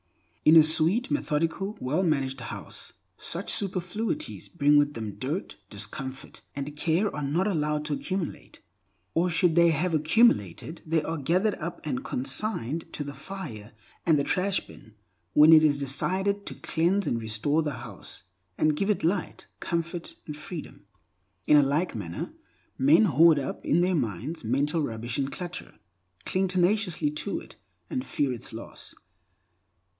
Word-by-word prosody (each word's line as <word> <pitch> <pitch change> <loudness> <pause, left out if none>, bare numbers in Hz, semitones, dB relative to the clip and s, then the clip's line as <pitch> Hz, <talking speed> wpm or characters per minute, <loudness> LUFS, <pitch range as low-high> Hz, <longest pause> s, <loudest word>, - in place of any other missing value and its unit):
In 155 - +7
a 160 - +10
sweet, 165 - +2
methodical, 185 - -1
well 145 +8 0
managed 135 -6 0
house, 115 - -8 0.3
such - - -1
superfluities, 205 - -2
bringing 145 -3 +4
with 145 0 +1
them 110 -3 -4
dirt, 145 - -4
discomfort, 130 +6 -3
and 140 +1 -5
care, 170 +7 0
are 150 - -3
not 150 +7 0
allowed 150 -6 0
to 150 - -1
accumulate. 185 +3 -4 0.5
Or 175 +2 +2
should 165 0 +3
they 170 +1 +6
have 165 +2 0
accumulated, 155 - +2
they 160 -1 +1
are 165 -1 -3
gathered 185 +9 +2
up 170 +1 -6
and 135 -5 -2
consigned 135 - -2
to 145 - -3
the 140 0 -6
fire 125 - -8 0.3
and 160 -3 +4
the 140 - +1
trash 190 +5 0
bin, 110 - -15 0.4
when 155 +2 +8
it 155 -1 +8
is 145 -2 +4
decided 190 +9 -1
to - - -3
cleanse 180 +5 +1
and 115 - -1
restore 110 +8 0
the 150 -2 -2
house, 120 -6 -6 0.3
and 155 -1 +3
give 195 +6 -1
it 210 - +1
light, 180 +2 -1
comfort, 170 0 -3
and 150 - -6
freedom. 155 +2 -9 0.6
In 150 - +6
a - - +8
like 145 +6 0
manner 85 -7 -5 0.5
men 150 +10 +6
hoard 165 -1 +6
up 135 -2 -4
in 170 - +3
their 185 +1 +2
minds 125 - -3
mental 140 +8 +1
rubbish 115 -1 -3
and 135 0 -1
clutter, 175 -1 -7 0.5
cling 190 +1 +1
tenaciously 180 -3 +1
to 150 +7 -2
it, - - -14 0.3
and 260 -3 -1
fear 140 - -1
its 120 - -5
loss. 115 +1 -6
155 Hz, 155 wpm, -27 LUFS, 140-180 Hz, 0.6 s, a